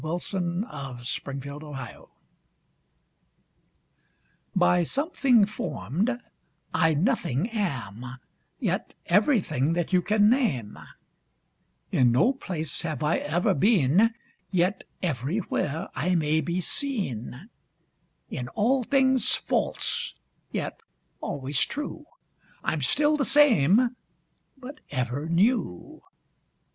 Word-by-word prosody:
ON 175 +3 -2
A 135 - -7
SHADOW 140 - -3
IN 140 - -4
A 140 +1 -7 0.2
GLASS; 130 -3 -9 2.5
By 180 - +4
something 265 - +3
form'd, 200 - -2 0.5
I 160 -2 +3
nothing 175 - +1
am, 125 - -3 0.4
Yet - - -2
everything 170 - +2
that 175 +2 -2
you 180 - +5
can 210 +2 +3
name; 185 - +1 1.1
In 125 -2 +4
no 180 - +4
place 160 - -5
have 155 -4 -3
I 150 +2 +2
ever 170 +5 +1
been, 200 - +3 0.3
Yet 185 +2 +1 0.2
everywhere 155 - -1
I 180 +3 0
may 155 -1 +2
be 175 +2 -2
seen; 190 - -4 0.8
In 125 - -4
all 235 - +1
things 260 0 +2
false, - - -1 0.4
yet - - -4 0.4
always 140 0 -1
true, 295 +1 -4 0.6
I'm 155 - -1
still 295 - +3
the 285 - +1
same 250 - +4 0.6
but 275 +3 -10
ever 130 +2 -2
new. 185 - 0
175 Hz, 100 wpm, -26 LUFS, 140-230 Hz, 2.5 s, you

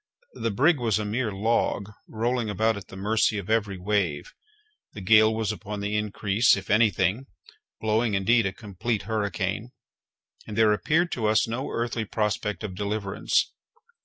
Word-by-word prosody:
The - - -2
brig 145 - +3
was 115 -4 +1
a 105 - -2
mere 110 +2 -1
log, 100 0 0 0.2
rolling 115 0 -1
about 110 +2 +1
at 100 -2 -9
the - - -11
mercy 105 +2 +1
of 100 +1 -4
every 105 -4 0
wave; 90 -6 -1 0.6
the - - -8
gale 110 +3 +6
was 110 -1 -1
upon 105 -1 -6
the 100 +1 -2
increase, 105 +1 +2
if 95 - -6
any 110 +1 +5
thing, 100 +7 -1 0.5
blowing 110 0 +1
indeed 100 +3 +3
a - - -2
complete 105 +1 -3
hurricane, 105 -1 -2 0.8
and 105 - -6
there 110 -1 +5
appeared 160 - +1
to 110 -3 -1
us 110 +1 +3
no 115 +4 -3
earthly 115 -1 -2
prospect 105 0 -2
of 105 -3 -4
deliverance. 100 +1 -1
105 Hz, 160 wpm, -26 LUFS, 100-115 Hz, 0.8 s, gale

